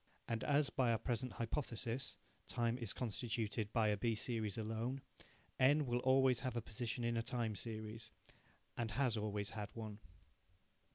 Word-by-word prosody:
And 115 -1 -1
as, 145 0 +3
by 125 -3 +3
our 115 - +3
present 120 +1 -1
hypothesis, 120 +1 -1 0.3
time 120 -1 +1
is 115 -5 -2
constituted 110 -2 -1
by 110 -3 +3
a 105 - +2
B 115 +2 +1
series 110 -2 -1
alone, 115 +4 -2 0.6
N 145 +3 +6
will 120 -1 +1
always 130 -1 +5
have 130 -2 -2
a - - +2
position 115 +2 -3
in 115 0 +1
a - - +2
time 115 -2 -1
series, 110 +1 -5 0.7
and 115 -2 -1
has 120 +2 +2
always 105 -1 -1
had 105 -2 -4
one. 110 -2 -5
115 Hz, 160 wpm, -39 LUFS, 110-125 Hz, 0.7 s, N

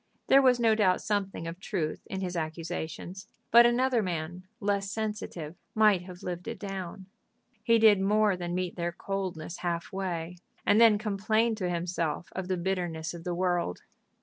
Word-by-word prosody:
There 275 - +8
was 255 -2 +4
no 225 -2 +4
doubt 195 -4 +3
something 200 -5 -2
of 165 +2 -6
truth 170 -6 -3
in 190 - -4
his 180 -1 -3
accusations; 165 +3 -5 0.2
but 235 +1 +9
another 245 0 +2
man, 175 0 -4
less 200 -2 0
sensitive, 210 -7 -4 0.2
might 210 -4 +5
have 180 -1 -11
lived 180 +1 -5
it 230 0 -4
down. 190 -2 -6 0.6
He 230 0 +4
did 215 -3 +6
more 210 0 +3
than 175 -1 -4
meet 180 -1 -3
their 170 0 -2
coldness 185 -4 -4
half 170 0 -3
way, 180 -2 -3 0.3
and 210 +2 +5
then 225 -2 +7
complained 215 +2 +1
to 185 -4 -1
himself 170 -1 -2
of 190 -1 -3
the 185 -1 0
bitterness 175 -3 -2
of 170 -1 -9
the 175 -1 -2
world. 175 - -1
185 Hz, 170 wpm, -29 LUFS, 175-210 Hz, 0.6 s, but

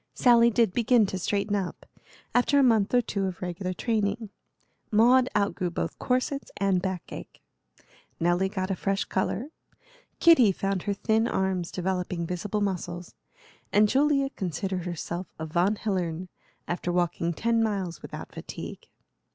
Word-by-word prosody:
Sally 235 -1 +6
did 230 -4 +2
begin 240 0 +4
to 190 -1 -3
straighten 200 +2 0
up, 190 -3 -4 0.5
after 245 +3 +3
a 280 - +6
month 220 -5 +3
or 245 - +4
two 200 -3 -1
of 185 - -5
regular 180 +1 -3
training; 215 +1 -1 0.6
Maud 245 +4 +5
outgrew 185 -3 0
both 170 - -4
corsets 255 +2 -1
and 195 -2 +2
backache; 185 -2 -6 0.8
Nelly 175 +3 +2
got 190 -1 -2
a - - 0
fresh 195 +2 -1
color; 210 +7 -2 0.7
Kitty 290 - +7
found 195 0 -2
her 200 - -1
thin 220 +3 +1
arms 190 -4 -1
developing 180 -1 -2
visible 190 +5 -2
muscles; 175 -3 -3 0.6
and 210 +1 +5
Julia 275 +2 +2
considered 185 +1 -3
herself 175 +1 -4
a 160 - -4
Von 175 +6 +1
Hillern, 185 -4 -2 0.4
after 175 0 -2
walking 175 -1 0
ten 230 +7 +1
miles 195 -7 -2
without - - -8
fatigue. - - -8
195 Hz, 145 wpm, -27 LUFS, 180-225 Hz, 0.8 s, Kitty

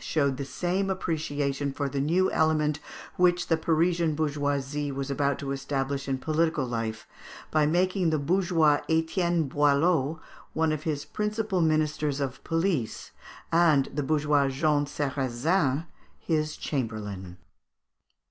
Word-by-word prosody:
showed 140 -4 0
the 140 - -4
same 185 +6 -1
appreciation 145 -6 -2
for 140 +1 -2
the 140 0 -2
new 175 +6 +2
element 155 -1 +2 0.4
which 180 -1 +3
the 165 - +4
Parisian 165 0 +1
bourgeoisie 145 -1 -1
was 135 0 -4
about 140 0 0
to 140 -1 -4
establish 140 0 -2
in 135 -1 0
political 155 0 0
life 115 -2 -3 0.5
by 155 -1 +3
making 180 +2 +2
the 155 - +1
bourgeois 165 -1 +2
Etienne 165 +1 +1
Boileau 145 +2 +2 0.3
one 160 0 +1
of 155 +2 -3
his 145 -2 -2
principal 210 -3 -1
ministers 155 -2 +1
of 135 -3 -4
police, 165 - -1 0.4
and 160 -5 +4
the 145 - -1
bourgeois 145 -1 +2
Jean 145 +1 +1
Sarrazin 140 +3 0 0.3
his 155 -2 -1
chamberlain. 105 - -4
150 Hz, 130 wpm, -27 LUFS, 140-165 Hz, 0.5 s, the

